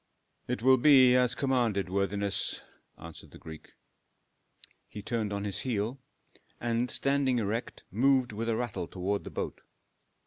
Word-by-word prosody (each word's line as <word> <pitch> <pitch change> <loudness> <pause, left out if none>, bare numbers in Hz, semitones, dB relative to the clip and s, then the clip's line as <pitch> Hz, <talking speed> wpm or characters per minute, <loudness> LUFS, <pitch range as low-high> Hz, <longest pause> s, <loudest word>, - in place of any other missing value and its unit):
"It 125 -2 -3
will 130 0 +6
be 130 -2 +6
as 125 0 +2
commanded, 120 -8 0
worthiness," 100 +1 -1 0.3
answered 85 -1 -11
the - - -14
Greek. 80 -1 -12 1.1
He 105 - -9
turned 110 -2 -2
on 100 0 -3
his 100 -2 -3
heel, 120 +1 -2 0.6
and 120 +1 -1
standing 135 -1 +2
erect 115 +1 -3
moved 130 +4 +2
with 115 +2 -3
a 115 - +1
rattle 100 -8 -3
toward 100 +3 -3
the - - -6
boat. - - -5
115 Hz, 140 wpm, -29 LUFS, 100-125 Hz, 1.1 s, will